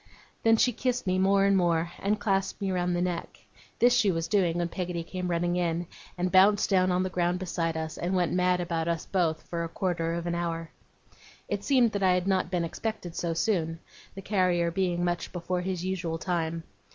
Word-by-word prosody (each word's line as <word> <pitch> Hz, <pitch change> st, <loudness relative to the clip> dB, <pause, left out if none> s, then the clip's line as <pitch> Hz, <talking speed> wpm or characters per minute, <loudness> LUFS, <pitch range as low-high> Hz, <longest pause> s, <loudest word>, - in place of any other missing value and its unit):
Then 225 Hz, 0 st, +4 dB
she 250 Hz, -, +3 dB
kissed 250 Hz, +2 st, -1 dB
me 185 Hz, 0 st, +1 dB
more 195 Hz, +1 st, +4 dB
and 200 Hz, 0 st, +4 dB
more, 170 Hz, -2 st, +1 dB
and 210 Hz, +2 st, 0 dB
clasped 195 Hz, -2 st, 0 dB
me 195 Hz, -2 st, -1 dB
round 180 Hz, -1 st, 0 dB
the 175 Hz, -, 0 dB
neck. 175 Hz, -2 st, -3 dB, 0.4 s
This 245 Hz, +1 st, +5 dB
she 210 Hz, -, +3 dB
was 165 Hz, -1 st, -2 dB
doing 180 Hz, -5 st, +2 dB
when 175 Hz, -1 st, 0 dB
Peggotty 175 Hz, -1 st, -4 dB
came 180 Hz, +1 st, -4 dB
running 175 Hz, 0 st, 0 dB
in, 170 Hz, 0 st, 0 dB, 0.3 s
and 180 Hz, 0 st, -1 dB
bounced 200 Hz, +2 st, +5 dB
down 185 Hz, -1 st, +3 dB
on 180 Hz, +1 st, +1 dB
the 185 Hz, -, -2 dB
ground 175 Hz, 0 st, +1 dB
beside 165 Hz, -3 st, -2 dB
us, 160 Hz, -1 st, -5 dB
and 180 Hz, +2 st, -1 dB
went 180 Hz, -2 st, +1 dB
mad 180 Hz, 0 st, +2 dB
about 170 Hz, -2 st, -2 dB
us 170 Hz, -1 st, -1 dB
both 170 Hz, -5 st, 0 dB
for 170 Hz, -1 st, -4 dB
a 165 Hz, -, -4 dB
quarter 170 Hz, -2 st, -1 dB
of 170 Hz, 0 st, -4 dB
an 170 Hz, -, -1 dB
hour. 165 Hz, -1 st, -3 dB, 0.8 s
It -, -, -3 dB
seemed 250 Hz, -5 st, +3 dB
that 200 Hz, -, -3 dB
I 185 Hz, -1 st, +4 dB
had 180 Hz, 0 st, 0 dB
not 190 Hz, -3 st, +1 dB
been 180 Hz, -2 st, 0 dB
expected 185 Hz, -1 st, -5 dB
so 170 Hz, -1 st, -2 dB
soon, 165 Hz, -4 st, 0 dB, 0.4 s
the 195 Hz, -, -8 dB
carrier 180 Hz, -4 st, +1 dB
being 175 Hz, -1 st, 0 dB
much 175 Hz, 0 st, -2 dB
before 180 Hz, 0 st, -2 dB
his 180 Hz, -1 st, -3 dB
usual 175 Hz, -3 st, -2 dB
time. 165 Hz, -1 st, -2 dB
180 Hz, 210 wpm, -28 LUFS, 170-190 Hz, 0.8 s, This